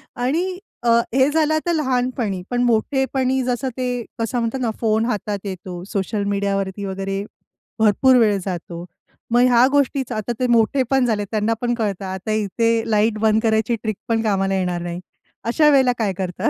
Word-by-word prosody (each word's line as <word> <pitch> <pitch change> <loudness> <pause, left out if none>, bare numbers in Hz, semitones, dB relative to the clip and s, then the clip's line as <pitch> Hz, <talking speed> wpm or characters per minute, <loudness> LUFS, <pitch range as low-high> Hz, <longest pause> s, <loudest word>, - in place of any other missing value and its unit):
आणि 330 +10 -1 0.3
अ, 240 - +2 0.2
हे 265 +2 +4
झालं 310 0 +2
आता 315 +2 0
लहानपणी. 250 - -1
पण 245 0 0
मोठेपणी 260 +2 +1
जसं 250 +1 -1
ते 255 -1 -1 0.3
कसं 230 +2 -1
म्हणतात 230 +3 -2
ना, 235 -3 0
फोन 220 0 +2
हातात 210 -3 -2
येतो, 185 -2 -6
सोशल 200 +1 -1
मीडिया 200 0 0
वरती 195 +1 -4
वगैरे 195 +1 -3 0.6
भरपूर 220 +5 +4
वेळ 215 -4 +4
जातो. 175 -2 -5 0.5
मग 240 +1 +4
ह्या 245 0 +5
गोष्टीच 280 -2 +1
आता 215 +2 -3
ते 255 - +1
मोठे 240 +3 +3
पण 265 -2 +3
झालेत, 210 -4 -1
त्यांना 215 +1 +1
पण 240 -1 0
कळतं. 205 -4 -2
आता 190 +3 -4
इथे 225 +2 +1
लाईट 215 0 +2
बंद 220 0 +3
करायची 220 +1 +2
ट्रिकपण 225 +1 -2
कामाला 195 -2 +1
येणार 180 -2 -1
नाही. 175 0 -5 0.4
अशा 300 +6 +3
वेळेला 265 -3 +4
काय 210 -4 0
करता? 185 -2 -1
225 Hz, 170 wpm, -21 LUFS, 200-255 Hz, 0.6 s, ह्या